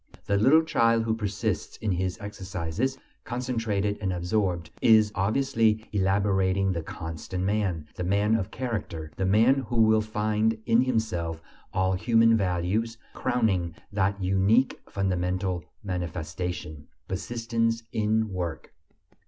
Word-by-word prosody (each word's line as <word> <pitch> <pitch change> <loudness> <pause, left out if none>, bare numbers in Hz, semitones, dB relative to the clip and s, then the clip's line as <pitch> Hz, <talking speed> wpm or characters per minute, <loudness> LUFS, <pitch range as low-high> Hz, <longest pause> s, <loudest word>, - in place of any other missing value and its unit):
The 100 - +1
little 135 +11 +5
child 115 -7 +3
who 115 0 0
persists 105 -2 -2
in 110 - -2
his 90 0 -1
exercises, 100 +3 -3 0.3
concentrated 115 -5 -1
and 95 -2 0
absorbed, 90 -2 -1
is 110 -2 +5
obviously 110 +1 +1
elaborating 95 -1 +2
the 85 -2 -2
constant 80 +3 -5
man, 95 -6 0
the 90 - -4
man 100 +4 +2
of 105 -4 0
character, 105 -11 -4
the 95 - 0
man 115 +6 +4
who 120 - 0
will 110 -1 +5
find 110 +1 0
in 115 +2 +4
himself 90 -10 -1 0.3
all 95 0 +1
human 115 +3 +4
values, 100 +4 0 0.2
crowning 105 -10 0 0.2
that 100 0 +1
unique 95 +7 +2
fundamental 90 -2 -1 0.2
manifestation: 90 -3 -4 0.2
persistence 115 +3 -1
in 110 +1 +1
work. 85 -3 -4
100 Hz, 120 wpm, -27 LUFS, 90-115 Hz, 0.3 s, little